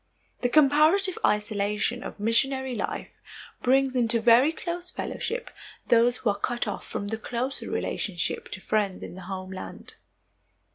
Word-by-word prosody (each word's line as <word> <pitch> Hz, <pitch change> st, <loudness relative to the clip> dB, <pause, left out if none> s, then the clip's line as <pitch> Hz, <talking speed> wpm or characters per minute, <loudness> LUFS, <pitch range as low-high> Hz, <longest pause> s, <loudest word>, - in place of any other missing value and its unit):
The 245 Hz, -, +2 dB
comparative 310 Hz, +7 st, +4 dB
isolation 210 Hz, +2 st, +1 dB
of -, -, -8 dB
missionary 265 Hz, +4 st, +1 dB
life 225 Hz, -, -4 dB, 0.4 s
brings 265 Hz, +1 st, +3 dB
into 235 Hz, -2 st, +2 dB
very 245 Hz, +6 st, +6 dB
close 345 Hz, +2 st, -4 dB
fellowship 475 Hz, +5 st, -4 dB, 0.4 s
those 240 Hz, +1 st, +5 dB
who 220 Hz, -, +1 dB
are 200 Hz, -, -5 dB
cut 240 Hz, +1 st, -1 dB
off 205 Hz, -, -5 dB
from 205 Hz, -, -4 dB
the 225 Hz, +1 st, -3 dB
closer 250 Hz, +4 st, -3 dB
relationship 180 Hz, -5 st, -2 dB
to 190 Hz, -, -7 dB
friends 205 Hz, -3 st, 0 dB
in -, -, -7 dB
the 185 Hz, -, -9 dB
homeland. 185 Hz, 0 st, -7 dB
235 Hz, 140 wpm, -27 LUFS, 205-270 Hz, 0.4 s, very